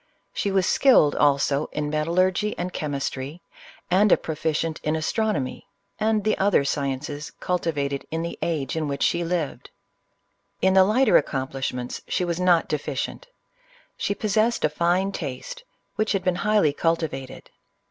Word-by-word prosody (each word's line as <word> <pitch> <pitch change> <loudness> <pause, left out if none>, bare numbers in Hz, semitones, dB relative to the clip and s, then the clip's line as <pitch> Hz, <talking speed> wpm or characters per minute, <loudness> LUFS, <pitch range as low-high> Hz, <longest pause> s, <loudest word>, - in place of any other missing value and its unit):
She 200 - -1
was 190 -2 +2
skilled, 245 - +5
also, 140 0 +2
in 150 -1 -3
metallurgy 180 +6 +1
and 180 +1 -4
chemistry; 145 +1 -4 0.5
and 195 +2 +4
a - - +7
proficient 160 0 -2
in 155 +1 0
astronomy, 160 - -1 0.3
and 215 -1 +1
the 215 +1 +2
other 195 -8 +3
sciences 145 +1 -3
cultivated 145 -6 -2
in 165 +1 -2
the 170 - -4
age 150 -6 -1
in 160 -2 -1
which 140 -1 -2
she 170 0 +1
lived. 165 -7 -3 0.9
In 190 0 +3
the 190 0 +7
lighter 220 +5 +4
accomplishments, 130 -2 -3
she 180 - 0
was 170 0 -2
not 180 -2 +3
de 150 - -1
ficient. - - -4 0.7
She 200 - -2
possessed 215 +1 +1
a - - +2
fine 175 +5 +1
taste, 165 - -6 0.3
which 215 0 +1
had 195 - -1
been 180 -1 +1
highly 205 -8 +2
cultivated. 155 -5 -2
165 Hz, 145 wpm, -24 LUFS, 145-190 Hz, 0.9 s, a